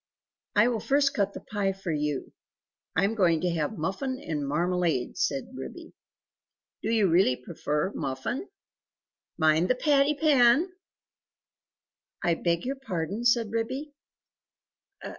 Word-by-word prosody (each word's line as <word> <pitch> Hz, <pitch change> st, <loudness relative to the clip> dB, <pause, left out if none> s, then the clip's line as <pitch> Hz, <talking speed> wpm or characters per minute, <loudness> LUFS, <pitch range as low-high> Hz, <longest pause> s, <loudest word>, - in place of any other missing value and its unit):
"I 210 Hz, +3 st, +6 dB
will 240 Hz, -2 st, 0 dB
first 275 Hz, +3 st, +2 dB
cut 200 Hz, -1 st, 0 dB
the -, -, -6 dB
pie 200 Hz, -2 st, -1 dB
for 190 Hz, -2 st, -5 dB
you; 150 Hz, -2 st, -2 dB, 0.6 s
I 165 Hz, -, +3 dB
am 200 Hz, +3 st, +2 dB
going 175 Hz, -7 st, +3 dB
to 180 Hz, -, +1 dB
have 165 Hz, +5 st, -2 dB
muffin 255 Hz, -, -2 dB
and 150 Hz, -, -3 dB
marmalade," 170 Hz, -3 st, 0 dB
said 135 Hz, -2 st, -1 dB
Ribby. 330 Hz, -, -8 dB, 0.9 s
"Do -, -, -2 dB
you 220 Hz, -4 st, +3 dB
really 170 Hz, -6 st, +4 dB
prefer 150 Hz, +5 st, -2 dB
muffin? 135 Hz, -, -3 dB, 0.9 s
Mind 160 Hz, +2 st, +3 dB
the 255 Hz, -, +4 dB
patty 285 Hz, +2 st, +3 dB
pan!" 285 Hz, +1 st, +4 dB, 1.5 s
"I 170 Hz, -, +3 dB
beg 170 Hz, +2 st, -1 dB
your 270 Hz, +2 st, -2 dB
pardon?" 200 Hz, -, -3 dB
said 235 Hz, -3 st, +3 dB
Ribby. 260 Hz, +6 st, -3 dB
195 Hz, 130 wpm, -27 LUFS, 160-250 Hz, 1.5 s, I